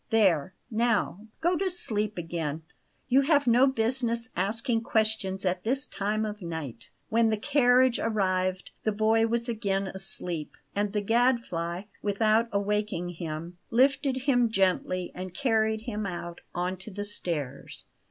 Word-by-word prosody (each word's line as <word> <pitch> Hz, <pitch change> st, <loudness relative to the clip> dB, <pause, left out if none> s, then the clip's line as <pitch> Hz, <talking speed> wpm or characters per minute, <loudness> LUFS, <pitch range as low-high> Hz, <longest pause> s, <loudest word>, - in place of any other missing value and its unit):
There, 185 Hz, -6 st, +3 dB, 0.2 s
now, 220 Hz, -2 st, 0 dB
go 345 Hz, +2 st, +3 dB
to 380 Hz, +2 st, 0 dB
sleep 215 Hz, -, -2 dB
again; 165 Hz, -2 st, -3 dB, 0.4 s
you 260 Hz, +2 st, +5 dB
have 285 Hz, 0 st, +3 dB
no 245 Hz, +3 st, +5 dB
business 235 Hz, -1 st, 0 dB
asking 225 Hz, +5 st, +1 dB
questions 215 Hz, -4 st, 0 dB
at 180 Hz, 0 st, 0 dB
this 270 Hz, +5 st, +2 dB
time 210 Hz, +2 st, -1 dB
of 210 Hz, 0 st, -5 dB
night." 160 Hz, -9 st, -6 dB, 0.2 s
When 225 Hz, 0 st, +3 dB
the 215 Hz, -, +1 dB
carriage 255 Hz, 0 st, +4 dB
arrived 185 Hz, -4 st, 0 dB
the 215 Hz, -, +2 dB
boy 220 Hz, +2 st, +3 dB
was 235 Hz, +1 st, -1 dB
again 200 Hz, -4 st, -1 dB
asleep; 180 Hz, -4 st, -4 dB, 0.2 s
and 205 Hz, 0 st, 0 dB
the 205 Hz, 0 st, -1 dB
Gadfly, 225 Hz, -7 st, +1 dB, 0.2 s
without 215 Hz, +3 st, +2 dB
awaking 205 Hz, -3 st, -1 dB
him, 170 Hz, +1 st, -6 dB
lifted 265 Hz, +1 st, +2 dB
him 245 Hz, -4 st, +3 dB
gently 185 Hz, -3 st, +1 dB
and 185 Hz, 0 st, -7 dB
carried 220 Hz, -4 st, +1 dB
him 215 Hz, -3 st, -3 dB
out 175 Hz, -1 st, -6 dB
on 180 Hz, +1 st, -1 dB
to 190 Hz, -, -7 dB
the 205 Hz, 0 st, -5 dB
stairs. 155 Hz, -9 st, -4 dB
215 Hz, 145 wpm, -28 LUFS, 185-235 Hz, 0.4 s, you